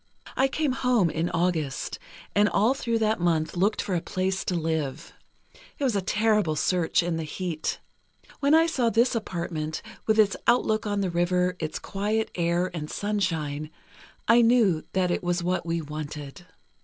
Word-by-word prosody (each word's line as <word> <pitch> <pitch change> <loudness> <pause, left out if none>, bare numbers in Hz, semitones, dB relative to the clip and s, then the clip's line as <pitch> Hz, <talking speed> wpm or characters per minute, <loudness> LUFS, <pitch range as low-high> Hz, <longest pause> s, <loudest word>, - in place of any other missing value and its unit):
"I 265 - +3
came 290 +1 0
home 245 -9 +2
in 165 +2 -1
August, 165 -5 -1 0.3
and 205 0 +4
all 220 +6 +3
through 235 -4 -1
that 220 -1 +1
month 165 -2 0
looked 195 +5 +1
for 195 - -3
a 175 - +1
place 190 +2 -2
to 180 - -1
live. 160 -2 -2 0.6
It 290 - -4
was 250 -6 +1
a 200 - +1
terrible 210 -4 +1
search 175 +2 +1
in 170 -1 -1
the 165 - -3
heat. 160 +1 -3 0.6
When 285 +2 +4
I 325 +1 +6
saw 265 -8 +1
this 235 +3 +3
apartment, 170 -8 -3 0.2
with 220 0 +3
its 205 -3 +4
outlook 220 -3 +2
on 205 -1 0
the 190 -2 -1
river, 180 +1 +1
its 155 -1 -3
quiet 210 +3 -2
air 175 +1 0
and 155 -3 -5
sunshine, 165 -8 -2 0.6
I 230 +2 +6
knew 225 -9 +4
that 185 -2 +1
it - - 0
was 175 0 0
what 180 -1 -1
we 165 -1 -1
wanted. 150 +2 -7
180 Hz, 170 wpm, -26 LUFS, 165-220 Hz, 0.6 s, I